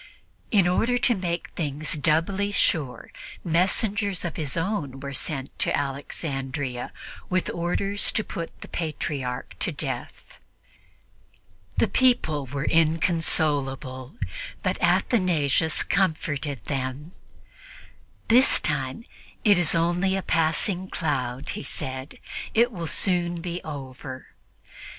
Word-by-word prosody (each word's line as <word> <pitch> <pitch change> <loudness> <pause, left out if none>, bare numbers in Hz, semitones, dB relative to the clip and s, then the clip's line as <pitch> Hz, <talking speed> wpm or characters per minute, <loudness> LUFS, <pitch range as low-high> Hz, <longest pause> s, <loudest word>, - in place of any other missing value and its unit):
In 195 -5 +4
order 230 +7 +2
to 245 - +3
make 175 -4 -2
things 150 0 -1
doubly 165 +6 +1
sure, 150 -9 0 0.3
messengers 195 +3 +1
of 170 - -3
his 150 -3 -3
own 165 -7 -2
were 140 0 -5
sent 135 -1 -4
to - - +2
Alexandria 135 -2 -3 0.4
with 185 0 +1
orders 195 +4 0
to 215 - +1
put 170 -4 -6
the - - -8
Patriarch 140 -6 -3
to - - +2
death. - - -6 1.4
The - - +4
people 155 - +2
were 135 +3 -3
inconsolable, 155 - +1 0.5
but - - -1
Athanasius 160 - +3
comforted 145 - 0
them. 135 +3 -3 1.2
"This 250 +3 +6
time 140 - -2 0.4
it 205 -3 +7
is 175 -2 +4
only 175 +3 +2
a 195 - -2
passing 175 +4 +1
cloud," 130 -5 -2
he - - -3
said; 130 0 -4 0.4
"it 235 +2 +5
will 170 -6 -4
soon 175 -1 +1
be 175 +1 -4
over." 130 -3 -7
160 Hz, 110 wpm, -26 LUFS, 140-185 Hz, 1.4 s, it